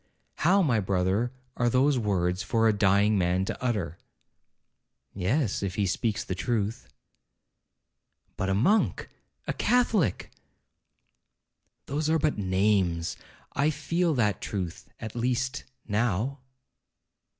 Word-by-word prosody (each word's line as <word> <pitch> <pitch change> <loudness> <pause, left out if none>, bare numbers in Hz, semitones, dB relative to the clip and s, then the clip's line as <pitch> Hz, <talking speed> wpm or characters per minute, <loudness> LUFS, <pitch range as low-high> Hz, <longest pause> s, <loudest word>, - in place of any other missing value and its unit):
'How, 185 +5 +4
my 125 -9 +2
brother, 95 +4 0 0.2
are 120 0 +1
those 130 +2 +3
words 90 -4 0
for 115 +3 +2
a 110 - +4
dying 100 0 +3
man 90 +1 +1
to - - -5
utter?' 100 -10 -1 1.1
'Yes, 100 - 0
if 95 -2 -3
he 100 - +1
speaks 100 +3 -1
the - - -4
truth.' 110 +3 -2 1.5
'But 95 - -2
a 95 - +2
monk?—a 195 - -1
catholic?' 220 - +1 1.5
'Those 150 +3 -1
are 160 - +4
but 155 -6 0
names—I 95 - 0
feel 160 +3 0
that 105 -6 +1
truth, 90 -5 -5
at 110 +1 -7
least, 125 +2 -1 0.2
now.' 115 +5 0
110 Hz, 110 wpm, -27 LUFS, 95-130 Hz, 1.5 s, How